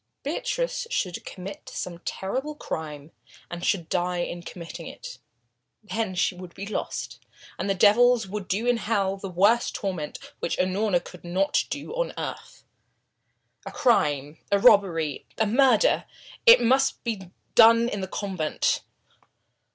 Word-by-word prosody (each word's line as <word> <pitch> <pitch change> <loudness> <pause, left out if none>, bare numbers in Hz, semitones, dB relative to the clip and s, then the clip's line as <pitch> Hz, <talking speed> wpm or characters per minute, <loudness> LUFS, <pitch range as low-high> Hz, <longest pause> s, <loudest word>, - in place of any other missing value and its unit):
Beatrice - - -2
should 185 - -2
commit 195 +2 -8
some 175 -2 -5
terrible 260 +12 -4
crime 155 - -6 0.4
and 175 0 -6
should 175 -5 0
die 180 0 -1
in 175 0 -4
committing 170 -1 -8
it. - - -9 0.6
Then 215 -2 -3
she 185 - +1
would 180 -1 -11
be 200 - -6
lost, 210 - -4 0.4
and 195 -2 -1
devils 235 +2 +5
would 200 -1 -5
do 210 +5 -1
in 245 -1 +3
hell 205 -4 0
the 195 0 -6
worst 205 +7 +3
torment 180 -7 -3 0.2
which - - -2
Unorna 185 0 +1
could 180 - -12
not 185 +3 +1
do 285 +10 -5
on - - -2
earth. - - -7 1.0
A - - -7
crime 150 - +1
a 200 - +5
robbery, 170 -8 +3
a 220 - +2
murder 265 - +4 0.4
it 470 - +10
must 265 +3 +2
be 205 -6 -4 0.2
done 230 +1 +7
in 205 -5 -3
the 190 - -3
convent. 185 -6 -1
195 Hz, 140 wpm, -26 LUFS, 175-230 Hz, 1.0 s, it